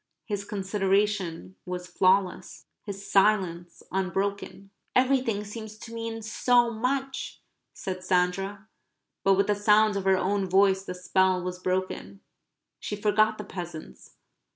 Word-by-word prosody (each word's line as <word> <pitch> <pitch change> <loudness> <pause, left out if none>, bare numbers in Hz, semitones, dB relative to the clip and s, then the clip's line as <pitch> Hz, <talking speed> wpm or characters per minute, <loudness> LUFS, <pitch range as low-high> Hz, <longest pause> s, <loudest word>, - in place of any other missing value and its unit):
His 205 -2 -3
consideration 195 -3 -1
was 180 -1 -5
flawless; 185 +1 +1 0.2
his 200 -1 -7
silence 185 -4 +2
unbroken. 195 +1 -2 0.2
"Everything 250 -5 +2
seems 215 0 -8
to 230 +1 -10
mean 225 -1 -5
so 240 +2 +3
much," 265 +4 -2 0.3
said 185 -1 -6
Sandra. 195 +3 0 0.6
But 195 0 +5
with 200 +1 +3
the 210 - +2
sound 210 +1 +4
of 195 -1 -2
her 190 -1 +4
own 195 0 0
voice 190 0 +4
the 180 - -5
spell 185 0 +2
was 180 0 -4
broken. 185 +2 -3 0.6
She 210 - -4
forgot 215 +1 +2
the 210 - -5
peasants. 165 - -9
195 Hz, 130 wpm, -27 LUFS, 185-215 Hz, 0.6 s, But